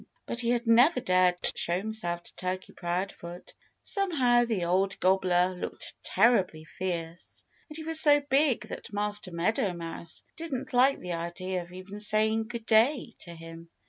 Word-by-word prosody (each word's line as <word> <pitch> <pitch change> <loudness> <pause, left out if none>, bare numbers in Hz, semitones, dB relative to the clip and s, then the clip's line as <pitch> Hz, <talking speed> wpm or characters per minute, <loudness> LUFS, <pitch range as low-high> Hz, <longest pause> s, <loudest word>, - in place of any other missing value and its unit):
But 235 - -3
he 235 - -1
had 240 0 +1
never 245 +6 +5
dared 185 -6 +3 0.2
show 170 +1 0
himself 185 -4 -3
to - - -17
Turkey 185 0 -4
Proudfoot. 175 0 -5 0.3
Somehow 265 -12 +2
the 215 -7 -1
old 190 +3 0
gobbler 185 -1 +2
looked 180 - -6
terribly 190 -7 +2
fierce. 170 -2 -6 0.3
And 305 - -8
he 320 - -6
was 320 0 +1
so 290 -1 +6
big 280 -3 +2
that - - -8
Master 205 -1 -2
Meadow 180 +3 0
Mouse 165 -1 -7
didn't 300 -4 -5
like 260 +3 +4
the 180 -1 -5
idea 175 +2 -4
of 175 0 -12
even 185 +3 -9
saying 220 +1 +2
"Good 235 -1 -6
day!" 235 +3 +3
to 170 -1 -10
him. 165 0 -11
195 Hz, 160 wpm, -28 LUFS, 175-240 Hz, 0.3 s, so